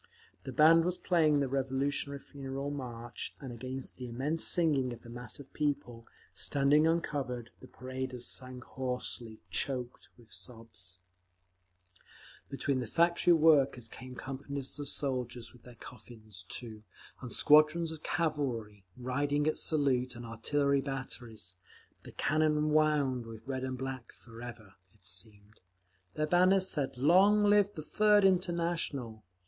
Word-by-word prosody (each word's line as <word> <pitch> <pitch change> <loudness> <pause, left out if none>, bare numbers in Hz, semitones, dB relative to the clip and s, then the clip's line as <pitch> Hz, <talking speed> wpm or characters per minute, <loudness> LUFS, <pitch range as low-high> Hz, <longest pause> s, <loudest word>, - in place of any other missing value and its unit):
The 135 - -4
band 160 +5 +6
was 180 +1 0
playing 155 -5 +3
the 140 - +1
Revolutionary 135 +2 -1
Funeral 140 0 -6
March, 120 -4 -6
and 135 -4 -7
against 130 +2 -6
the 125 -1 -6
immense 145 +7 -1
singing 145 -7 +2
of 120 - -12
the 120 - -11
mass 120 0 -7
of 140 - -13
people, 125 -6 -2 0.3
standing 145 +2 +3
uncovered, 140 -8 -2
the - - -13
paraders 130 -1 -5
sang 130 -1 -1
hoarsely, 125 -3 -4
choked 125 -3 -3
with 115 -3 -19
sobs…. 110 -8 -10 1.5
Between 140 -1 -1
the 125 - -3
factory 170 +5 +4
workers 145 -7 +4
came 125 +2 -10
companies 135 +1 -6
of 145 - -4
soldiers 125 -4 -3
with 120 - -18
their 125 0 -14
coffins, 110 -4 -10
too, 110 -3 -5 0.4
and 125 -2 -7
squadrons 155 +2 +5
of 160 -1 -8
cavalry, 125 - -2
riding 145 +4 0
at 155 - +1
salute, 130 -5 +1
and 120 0 -8
artillery 140 +5 +1
batteries, 120 - -6 0.4
the - - -11
cannon 155 0 +1
wound 145 -6 +2
with 115 0 -10
red 130 -1 -3
and 130 -1 -3
black—forever, 120 -4 -8 0.2
it 95 - -19
seemed. 100 +3 -4 0.6
Their 155 - +1
banners 185 +3 +4
said, 140 -7 -2
"Long 190 +10 +5
live 205 -1 +4
the 155 - -6
Third 210 +4 +4
International!" 170 - 0
135 Hz, 135 wpm, -32 LUFS, 120-150 Hz, 1.5 s, band